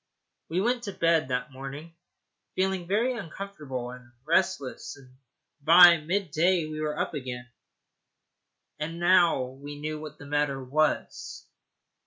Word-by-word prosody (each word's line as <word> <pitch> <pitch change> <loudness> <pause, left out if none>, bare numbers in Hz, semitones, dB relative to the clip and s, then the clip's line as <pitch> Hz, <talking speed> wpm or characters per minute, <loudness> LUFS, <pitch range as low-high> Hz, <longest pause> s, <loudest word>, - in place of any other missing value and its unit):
We 175 +4 0
went 240 +3 +1
to 200 - -5
bed 165 -5 +2
that 130 +2 -2
morning 135 +5 -8 0.6
feeling 190 -2 0
very 230 +7 +1
uncomfortable 155 - -6
and 125 -1 -13
restless, 170 -6 0
and 130 -2 -18 0.5
by 170 +3 +9
mid 175 +3 -2
day 170 +2 +2
we 155 0 -5
were 150 -1 -2
up - - -2
again. 125 -4 -5 1.3
And 165 +2 -4
now 175 -5 +4
we 140 +3 -9
knew 155 +1 -4
what 150 -1 -9
the 145 - -12
matter 145 -1 0
was. 150 +4 -1
155 Hz, 135 wpm, -27 LUFS, 140-180 Hz, 1.3 s, by